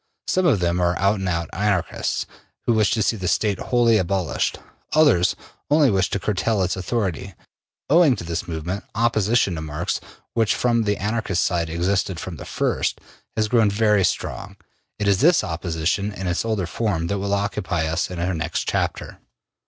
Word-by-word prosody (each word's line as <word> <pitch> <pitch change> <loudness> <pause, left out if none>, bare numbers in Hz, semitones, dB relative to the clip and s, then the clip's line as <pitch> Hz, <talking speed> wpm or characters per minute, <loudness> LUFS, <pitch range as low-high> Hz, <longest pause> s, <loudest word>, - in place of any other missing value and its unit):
Some 185 -1 +2
of 120 - +3
them 85 +1 +1
are 85 0 +1
out 100 +2 +2
and 95 -1 -2
out 85 -2 -1
Anarchists, 100 -3 -1 0.4
who 120 - +3
wish 110 -2 +3
to 110 - +1
see 115 - +1
the 95 -2 -3
State 100 +2 +1
wholly 120 -3 +3
abolished; 95 -1 -1 0.4
others 145 - +4 0.3
only 145 -3 +4
wish 95 -1 +1
to 100 - -1
curtail 105 +1 0
its 90 -1 0
authority. 95 - -3 0.5
Owing 155 -3 +5
to - - -7
this 85 0 -4
movement, 85 +4 -4
opposition 110 -2 +2
to 80 - -4
Marx, 80 +2 -3 0.3
which 115 -2 +2
from 115 -2 +1
the 105 -1 +1
Anarchist 105 -3 -1
side 85 -2 0
existed 90 +1 0
from 85 -2 -6
the - - -9
first, - - -1 0.4
has 110 -1 +2
grown 110 -2 +3
very 105 -1 +3
strong. 95 +2 -2 0.4
It 105 - -1
is 100 -1 +3
this 170 -3 +5
opposition 85 +3 -1
in 95 -2 -6
its 90 0 0
older 110 -5 0
form 85 -3 -1
that 100 +4 -2
will 100 +1 0
occupy 100 -5 -1
us 80 +2 -1
in 90 - -6
our 90 +2 -1
next 80 -1 -3
chapter. - - -2
100 Hz, 180 wpm, -22 LUFS, 85-110 Hz, 0.5 s, Owing